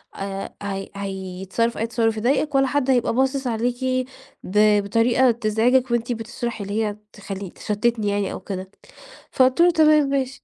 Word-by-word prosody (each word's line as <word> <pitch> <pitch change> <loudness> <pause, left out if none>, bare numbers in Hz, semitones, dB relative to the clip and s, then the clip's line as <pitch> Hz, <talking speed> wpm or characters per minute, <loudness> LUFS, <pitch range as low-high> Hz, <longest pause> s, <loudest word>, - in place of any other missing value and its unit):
آآ 195 0 -5
هي 195 -1 -4
هيتصرف 195 +3 -3
أي 225 - -1
تصرف 225 -1 0
يضايقِك 275 +6 0
ولا 270 0 +4
حد 270 0 0
هيبقى 245 -3 +2
باصص 265 +2 0
عليكِ 245 +2 -1 0.4
ب 210 +1 +3
بطريقة 235 +4 +3
تزعجِك 235 +3 +1
وأنتِ 240 0 0
بتشرحي، 235 -1 -4
اللي 205 +3 -1
هي 210 -1 -4 0.2
تخلي 195 -2 -7
تشتتني 215 +3 -1
يعني 200 -1 -1
أو - - -6
كده." 190 -1 -6 0.6
فقُلت 260 +4 +3
له: 350 0 +6
"تمام 305 -3 +4
ماشي." 275 -1 -2
230 Hz, 155 wpm, -22 LUFS, 205-255 Hz, 0.6 s, له